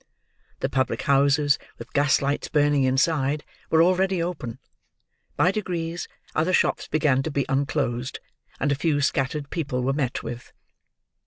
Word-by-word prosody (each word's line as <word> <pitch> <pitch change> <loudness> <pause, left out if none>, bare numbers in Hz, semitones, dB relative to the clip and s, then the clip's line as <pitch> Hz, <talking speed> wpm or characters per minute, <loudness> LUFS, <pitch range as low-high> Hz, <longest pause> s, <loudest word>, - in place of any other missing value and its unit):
The - - +1
public 130 -1 0
houses, 140 +1 +3 0.2
with - - -11
gas 140 -1 +3
lights 140 +1 -1
burning 145 -2 +3
inside, 140 +2 +1 0.3
were 160 0 +5
already 185 +1 +2
open. 165 -9 -4 0.8
By 180 - +4
degrees, 175 -4 -3 0.3
other 165 +4 +1
shops - - +2
began 145 -3 +2
to 160 - -3
be 140 -2 -1
unclosed, 135 -3 -1 0.4
and 145 - +1
a - - +4
few 145 0 +1
scattered 140 +1 -1
people 135 -7 -2
were 135 +2 +1
met 135 -4 -2
with. 120 +1 -7
145 Hz, 145 wpm, -25 LUFS, 135-160 Hz, 0.8 s, were